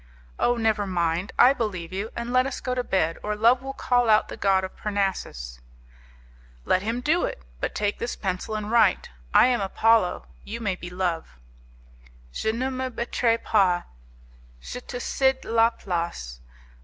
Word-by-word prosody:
"Oh, 245 0 +2
never 220 -3 +1
mind! 175 0 -1
I 250 +3 +7
believe 185 -9 -4
you, 200 +4 -3
and 235 +1 -4
let 255 +1 +4
us 270 - -5
go 255 - -2
to 250 0 -1
bed, 165 -7 0
or 210 0 -2
Love 235 +4 +4
will 270 0 -5
call 245 -3 +1
out 215 0 +4
the - - -6
god 190 -1 +2
of 190 - -6
Parnassus." 190 - -3 1.1
"Let 185 - +2
him 230 +4 -2
do 320 +6 +2
it, 65 - -6 0.2
but - - -3
take 205 -1 -1
this 235 - -3
pencil 190 +2 -3
and 215 0 -4
write; 235 - +3 0.2
I - - +7
am 245 -3 +2
Apollo, 220 0 +2 0.2
you 230 +3 -6
may 205 -5 -1
be 175 -1 -8
Love." 180 - -3 1.0
'Je 220 - 0
ne 255 +4 -2
me 260 0 -3
battrai 235 -1 0
pas; 185 -5 +3 0.8
je 250 - -7
te 245 - -7
cede 265 +1 +1
la 230 0 +4
place. 170 - -4
215 Hz, 170 wpm, -25 LUFS, 185-240 Hz, 1.1 s, I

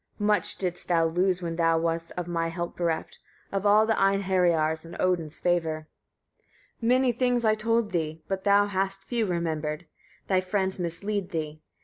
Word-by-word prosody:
Much 205 -4 +1
didst 180 -2 -4
thou 165 -2 +3
lose, 180 +2 +1
when 165 -1 -3
thou 165 -1 +3
wast 165 0 -1
of 175 -1 -3
my 165 -1 -1
help 170 +1 -4
bereft, 170 -2 -2 0.3
of 200 +1 0
all 210 +2 +6
the 225 - +2
Einheriar's 180 -6 +2
and 170 +1 -10
Odin's 170 -4 0
favour. 160 -3 0 0.9
52. 230 - -2
Many 255 +1 +4
things 245 0 +1
I 215 - +5
told 225 0 0
thee, 160 -2 -2
but 190 -1 -3
thou 205 0 +5
hast 195 -1 -2
few 235 -3 -1
remembered: 160 -2 -2 0.4
thy 190 -1 +2
friends 190 0 -1
mislead 190 +3 -3
thee. 155 -2 -4
180 Hz, 165 wpm, -27 LUFS, 165-200 Hz, 0.9 s, all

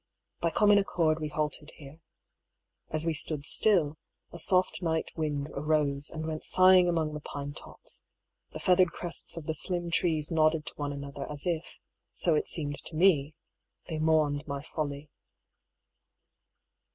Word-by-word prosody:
By 170 - +1
common 205 +3 +5
accord 165 -5 +1
we 155 - -2
halted 150 0 -3
here. 145 +2 -13 0.9
As 155 +1 -1
we 165 - +1
stood 150 -1 0
still, 160 -8 +2 0.3
a 170 - -8
soft 185 +3 +4
night 160 -2 -1
wind 150 -2 -2
arose 145 -1 0
and 160 0 -6
went 155 -1 -4
sighing 185 -1 +6
among 160 -3 0
the 150 - -4
pine 145 -1 -6
tops; - - -7 0.5
the - - -7
feathered 185 -1 +3
crests 175 -1 -4
of 165 - -6
the 160 - -1
slim 175 +2 -3
trees 160 -3 +1
nodded 155 -1 +2
to - - -7
one 145 -1 -3
another 140 0 -6
as 145 -1 -5
if, 170 -2 -3 0.4
so 170 - +3
it 150 - +1
seemed 145 -3 -4
to 160 - -3
me, 155 -4 +3 0.5
they 160 -2 -3
mourned 155 -2 +2
my 140 -1 -4
folly. 145 -1 -5
155 Hz, 155 wpm, -29 LUFS, 145-170 Hz, 0.9 s, sighing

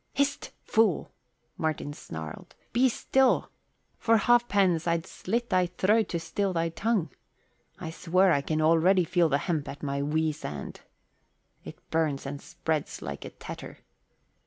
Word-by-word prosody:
"Hist, 280 0 0
fool," 220 -6 +2 0.5
Martin 155 -2 -2
snarled. 80 - -8 0.2
"Be 255 +3 +4
still! 265 +2 +2 0.5
For 225 0 +4
ha'pence 200 -7 +3
I'd 170 -1 +1
slit 235 +5 -3
thy 185 -1 +3
throat 200 +4 +2
to 170 - -1
still 195 +3 -1
thy 165 -1 0
tongue. 200 0 0 0.7
I 160 -3 -6
swear 180 +3 +3
I 140 - +3
can 155 +2 -1
already 170 +4 +5
feel 170 0 +2
the 140 - +3
hemp 155 -2 -2
at 145 - -9
my 140 -1 -1
weasand. 150 - -2 0.8
It - - -9
burns 155 -4 0
and 140 +1 -5
spreads 160 -1 -3
like - - -6
a - - -6
tetter." - - -9
170 Hz, 140 wpm, -28 LUFS, 155-200 Hz, 0.8 s, already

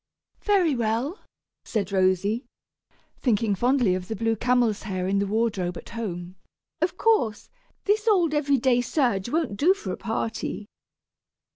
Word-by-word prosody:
"Very 370 -8 +3
well," 235 - -1 0.4
said 205 -4 -2
Rosy, 195 +5 +1 0.7
thinking 225 -4 +1
fondly 245 -1 +2
of 185 0 -3
the 220 - -3
blue 225 +2 0
camel's 240 -2 +1
hair 185 -3 -3
in 195 +1 +1
the 200 - 0
wardrobe 200 -5 -1
at - - -10
home; 185 -5 -5 0.4
"of 350 +2 0
course, 370 - +1 0.3
this 425 +2 +1
old 355 -8 +3
every 285 -2 +2
day 245 -1 +3
serge 240 -6 0
won't 310 -8 -1
do 355 - +4
for 195 - -6
a - - -4
party." 225 -1 -3
230 Hz, 145 wpm, -25 LUFS, 200-280 Hz, 0.7 s, do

